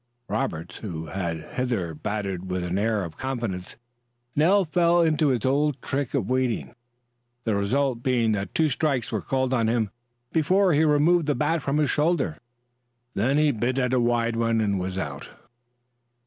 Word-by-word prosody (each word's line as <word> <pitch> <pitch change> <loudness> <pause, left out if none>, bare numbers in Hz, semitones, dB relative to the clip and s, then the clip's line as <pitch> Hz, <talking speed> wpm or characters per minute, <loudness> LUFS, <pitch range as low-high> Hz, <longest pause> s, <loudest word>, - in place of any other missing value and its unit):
Roberts, 90 -9 -3
who 85 -7 -6
had 85 -2 -4
hitherto 115 -10 -2
batted 95 +1 -4
with 90 -1 -2
an 90 +2 -1
air 110 -1 +1
of 85 -2 -8
confidence, 115 -9 -4 0.6
now 185 +7 +4
fell 170 +1 +3
into 155 -1 +2
his 125 -4 +1
old 145 +1 +1
trick 140 -2 -2
of - - 0
waiting, 130 -2 -1 0.7
the 115 - 0
result 120 +5 0
being 120 -3 +2
that 100 -2 -3
two 160 - +3
strikes 140 -4 0
were 110 -3 -1
called 130 +2 0
on 115 -3 +2
him 115 -3 0 0.4
before 185 +3 +3
he 150 +2 +4
removed 155 +2 +3
the 145 - +2
bat 155 +2 0
from 140 +1 -1
his 150 -2 +2
shoulder. 150 - +1 0.7
Then 130 +8 +1
he 150 -1 +4
bit 125 +2 -1
at 125 -1 +1
a 130 - +3
wide 120 -1 +1
one, 115 0 +1
and 100 -3 +1
was 95 +1 -3
out. 70 -7 -5
125 Hz, 170 wpm, -25 LUFS, 100-145 Hz, 0.7 s, now